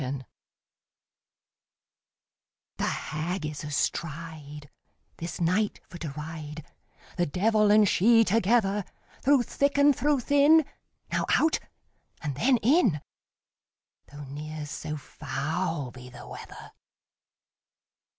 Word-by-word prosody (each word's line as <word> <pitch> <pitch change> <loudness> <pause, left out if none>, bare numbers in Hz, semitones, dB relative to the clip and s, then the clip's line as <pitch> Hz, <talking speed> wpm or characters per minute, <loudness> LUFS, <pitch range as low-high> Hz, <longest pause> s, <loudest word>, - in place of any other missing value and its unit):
THE 130 - -3
HAG 130 0 -5 2.5
The - - -1
Hag 160 +2 -3
is 150 0 -5
astride, 150 -1 -4 0.5
This 165 -1 -6
night 190 +5 +1
for 175 - -10
to 160 - -4
ride, 150 -1 -7 0.5
The 175 - +1
devil 210 +6 +2
and 210 0 +6
she 225 +5 +5
together; 210 -1 +2 0.4
Through 275 -1 +4
thick 280 +4 0
and 285 0 +5
through 285 +1 +1
thin, 285 +4 +5 0.5
Now - - 0
out, 315 0 +3 0.6
and 145 -2 -2
then 245 - +3
in, 235 - +3 1.1
Though 145 0 -9
ne'er 150 +2 -6
so 150 +1 -5
foul 150 +1 -3
be 125 0 -11
the 125 - -12
weather. - - -10
170 Hz, 110 wpm, -27 LUFS, 150-225 Hz, 2.5 s, and